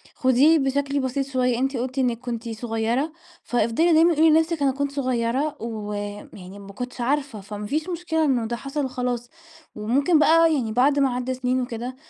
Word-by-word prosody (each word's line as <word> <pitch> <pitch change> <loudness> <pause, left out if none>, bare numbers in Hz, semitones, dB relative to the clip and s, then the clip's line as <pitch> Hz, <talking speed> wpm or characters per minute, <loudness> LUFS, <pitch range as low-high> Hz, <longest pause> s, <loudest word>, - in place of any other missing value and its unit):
خديه 275 +5 +4
بشكل 280 +1 0
بسيط 260 +1 -1
شوية، 250 -2 0
أنتِ 270 0 -1
قُلتِ 255 +2 -4
إنِك 240 -3 0
كنتِ 235 -2 -5
صغيرة، 225 +5 -2 0.3
فأفضلي 245 +9 +1
دايمًا 330 +1 +5
قولي 320 +1 +5
لنفسِك 320 0 +2
أنا 270 - +3
كنت 280 +1 -2
صغيرة 260 +2 -1
ويعني 205 -3 -6
ما 200 0 -11
كنتش 250 +3 -6
عارفة، 270 -4 -1
فما 205 +1 -7
فيش 310 - -2
مشكلة 325 -2 -1
إنه 245 -5 +1
ده 235 +1 -3
حصل 275 +1 -3
خلاص، 245 -1 -3 0.5
وممكن 275 +10 +2
بقى 330 +1 +5
يعني 230 -5 -2
بعد 275 +5 +3
ما 265 -3 +2
عدّى 250 +1 -2
سنين 255 0 -1
وكده 245 +1 -5
255 Hz, 175 wpm, -23 LUFS, 235-285 Hz, 0.5 s, دايمًا